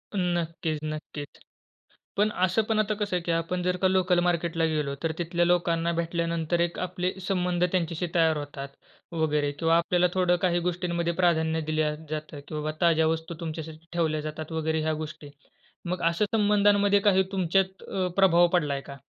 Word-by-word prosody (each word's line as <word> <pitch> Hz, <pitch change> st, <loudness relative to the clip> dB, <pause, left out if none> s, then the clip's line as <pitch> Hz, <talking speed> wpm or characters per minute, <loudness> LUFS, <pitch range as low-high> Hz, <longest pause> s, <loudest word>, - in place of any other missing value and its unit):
नक्कीच, 170 Hz, -3 st, -1 dB
नक्कीच. 155 Hz, -1 st, -6 dB, 0.8 s
पण 210 Hz, +1 st, +3 dB, 0.2 s
असं 185 Hz, +4 st, +2 dB
पण 220 Hz, -1 st, +2 dB
आता 215 Hz, 0 st, +1 dB
कसं 205 Hz, -2 st, -2 dB
आहे 180 Hz, -, 0 dB
की 170 Hz, -, -1 dB
आपण 165 Hz, +2 st, -1 dB
जर 180 Hz, 0 st, 0 dB
का 190 Hz, +1 st, +2 dB
लोकल 185 Hz, -1 st, +3 dB
मार्केटला 170 Hz, -1 st, +1 dB
गेलो, 150 Hz, -3 st, -1 dB
तर 165 Hz, -, +1 dB
तिथल्या 175 Hz, 0 st, +1 dB
लोकांना 170 Hz, -1 st, +2 dB
भेटल्यानंतर 170 Hz, 0 st, -1 dB
एक 170 Hz, 0 st, -1 dB
आपले 180 Hz, 0 st, -2 dB, 0.2 s
संबंध 180 Hz, -2 st, 0 dB
त्यांच्याशी 170 Hz, -1 st, -1 dB
तयार 160 Hz, -2 st, +3 dB
होतात 145 Hz, -1 st, -6 dB, 0.5 s
वगैरे 150 Hz, -3 st, +1 dB
किंवा 165 Hz, +3 st, +2 dB
आपल्याला 175 Hz, +1 st, +2 dB
थोडं 180 Hz, -1 st, +3 dB
काही 175 Hz, -1 st, +2 dB
गोष्टींमध्ये 170 Hz, -1 st, -1 dB
प्राधान्य 160 Hz, -2 st, +2 dB
दिल्या 155 Hz, -1 st, +1 dB, 0.2 s
जातं 155 Hz, -1 st, -5 dB
की 155 Hz, -, -6 dB
बाबा 150 Hz, 0 st, -2 dB
ताज्या 165 Hz, -2 st, +4 dB
वस्तू 160 Hz, +1 st, -2 dB
तुमच्यासाठी 160 Hz, 0 st, -6 dB
ठेवल्या 160 Hz, -3 st, 0 dB
जातात 155 Hz, +1 st, -6 dB
वगैरे 160 Hz, 0 st, 0 dB
ह्या 155 Hz, 0 st, 0 dB
गोष्टी. 155 Hz, -1 st, -9 dB, 0.6 s
मग 180 Hz, +1 st, -2 dB
अशा 170 Hz, +5 st, +2 dB
संबंधांमध्ये 205 Hz, -1 st, +4 dB
काही 190 Hz, -2 st, +4 dB
तुमच्यात 190 Hz, 0 st, 0 dB
अ, 185 Hz, -1 st, -2 dB
प्रभाव 175 Hz, -3 st, +5 dB
पडलाय 145 Hz, -5 st, 0 dB
का? 140 Hz, 0 st, -10 dB
170 Hz, 165 wpm, -27 LUFS, 160-180 Hz, 0.8 s, प्रभाव